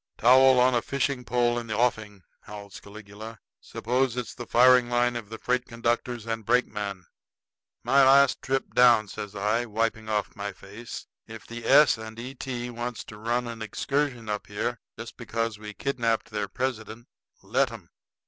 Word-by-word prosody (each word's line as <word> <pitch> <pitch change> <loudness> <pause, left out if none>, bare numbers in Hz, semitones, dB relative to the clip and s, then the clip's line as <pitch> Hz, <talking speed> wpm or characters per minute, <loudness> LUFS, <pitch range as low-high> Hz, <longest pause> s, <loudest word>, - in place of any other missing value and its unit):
"Towel 130 +2 +6
on 125 +1 +4
a 120 - +2
fishing 140 -1 -2
pole 120 -1 +1
in 120 - -8
the 110 -1 -3
offing!" 110 -5 -1 0.2
howls 100 -1 -10
Caligula. 105 +2 -11 0.2
"Suppose 125 +1 -1
it's 125 - -4
the 120 -2 -9
firing 125 0 +5
line 120 0 +1
of 115 -4 -6
the 110 - -7
freight 125 +2 -1
conductors 120 0 -2
and 115 -1 -3
brakeman." 100 -5 -1 0.8
"My 140 +1 +4
last 135 0 +5
trip 135 0 -2
down," 120 -3 +5
says 105 0 -7
I, 105 +4 0
wiping 110 0 -2
off 105 -1 -1
my 100 0 -5
face. 105 +5 -10 0.2
"If 110 -1 -10
the 120 0 -7
S. 140 -4 +6
& 110 - -14
E. 125 +3 -7
T. 125 -2 -5
wants 120 0 -5
to 105 - -11
run 120 +3 -1
an 115 -1 -7
excursion 130 +1 -2
up 105 -1 -3
here 110 +3 -3 0.2
just - - -9
because 115 -2 -3
we 105 -1 -9
kidnapped 115 -4 -1
their 105 -1 -2
president, 120 -2 -4 0.4
let - - +1
'em. - - -12
115 Hz, 170 wpm, -26 LUFS, 110-125 Hz, 0.8 s, Towel